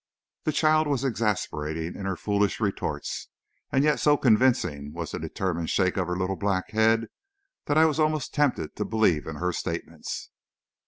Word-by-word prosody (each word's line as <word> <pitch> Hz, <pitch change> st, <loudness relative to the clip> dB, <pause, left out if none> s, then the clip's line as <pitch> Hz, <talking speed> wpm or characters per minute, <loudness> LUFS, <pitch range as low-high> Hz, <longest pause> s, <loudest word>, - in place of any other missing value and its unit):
The 155 Hz, -, +2 dB
child 155 Hz, +1 st, +3 dB
was 140 Hz, -3 st, 0 dB
exasperating 85 Hz, -, -1 dB
in 95 Hz, -, -5 dB
her 95 Hz, -, -1 dB
foolish 100 Hz, +2 st, 0 dB
retorts 100 Hz, -3 st, -2 dB, 0.4 s
and 135 Hz, -, +3 dB
yet 150 Hz, 0 st, +3 dB
so 145 Hz, -1 st, +4 dB
convincing 105 Hz, -, +2 dB
was 85 Hz, -2 st, -5 dB
the -, -, -4 dB
determined 85 Hz, -4 st, -2 dB
shake 95 Hz, -2 st, +2 dB
of 90 Hz, -3 st, 0 dB
her 90 Hz, 0 st, -2 dB
little 95 Hz, +1 st, -1 dB
black 100 Hz, -2 st, -1 dB
head 110 Hz, +1 st, +3 dB, 0.6 s
that 145 Hz, -, +1 dB
I 160 Hz, -, +7 dB
was 160 Hz, 0 st, +1 dB
almost 155 Hz, -2 st, +1 dB
tempted 140 Hz, -, 0 dB
to 105 Hz, -, 0 dB
believe 105 Hz, -9 st, +1 dB
in -, -, -5 dB
her 90 Hz, 0 st, -1 dB
statements. 85 Hz, -1 st, -5 dB
105 Hz, 170 wpm, -26 LUFS, 90-135 Hz, 0.6 s, I